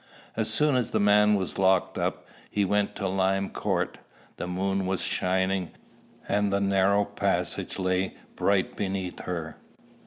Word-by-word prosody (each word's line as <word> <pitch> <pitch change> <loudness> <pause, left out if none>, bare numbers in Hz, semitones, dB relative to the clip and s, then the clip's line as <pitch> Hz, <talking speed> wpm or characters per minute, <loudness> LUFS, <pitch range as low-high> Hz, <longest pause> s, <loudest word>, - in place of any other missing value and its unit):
As 110 -1 0
soon 150 +5 +3
as 125 -3 +1
the - - 0
man 105 +1 +5
was 95 -2 -2
locked 95 -1 +3
up, - - -2 0.2
he 100 -1 +1
went 105 +1 0
to 100 - -2
Lime 95 +1 0
Court. - - -2 0.4
The - - -4
moon 95 +1 -1
was 95 -1 -1
shining, 95 -1 0 0.6
and 105 0 +1
the 100 - +2
narrow 100 +1 +3
passage - - -2
lay 95 0 0 0.2
bright 100 -2 +1
beneath 95 -2 -3
her. 85 -3 -5
95 Hz, 150 wpm, -27 LUFS, 95-100 Hz, 0.6 s, man